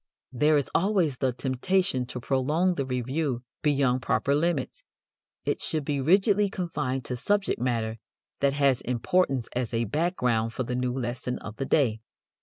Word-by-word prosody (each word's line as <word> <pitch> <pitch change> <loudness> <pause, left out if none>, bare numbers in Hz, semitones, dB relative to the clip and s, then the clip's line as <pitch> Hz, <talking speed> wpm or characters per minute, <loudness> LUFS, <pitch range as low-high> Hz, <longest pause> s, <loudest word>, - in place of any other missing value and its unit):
There 150 +4 +3
is 140 - 0
always 180 -8 +2
the 130 -1 +1
temptation 130 +2 0
to 125 - -6
prolong 150 +9 +1
the 140 -5 -3
review 130 +1 -2 0.2
beyond 135 -4 +2
proper 140 +2 +1
limits. 150 -2 -1 0.6
It - - -1
should 155 -3 -2
be 145 -2 -1
rigidly 200 - +4
confined 150 -9 -3
to 125 - -3
subject 200 - 0
matter 115 -3 -1 0.4
that 140 -1 +2
has 140 -3 +2
importance 125 +1 +1
as 120 -2 -1
a 115 - +1
background 125 - 0
for 130 - -2
the 125 - -4
new 125 0 0
lesson 125 0 -3
of 105 +1 -9
the 135 - -2
day. 120 -9 +2
135 Hz, 160 wpm, -27 LUFS, 125-155 Hz, 0.6 s, rigidly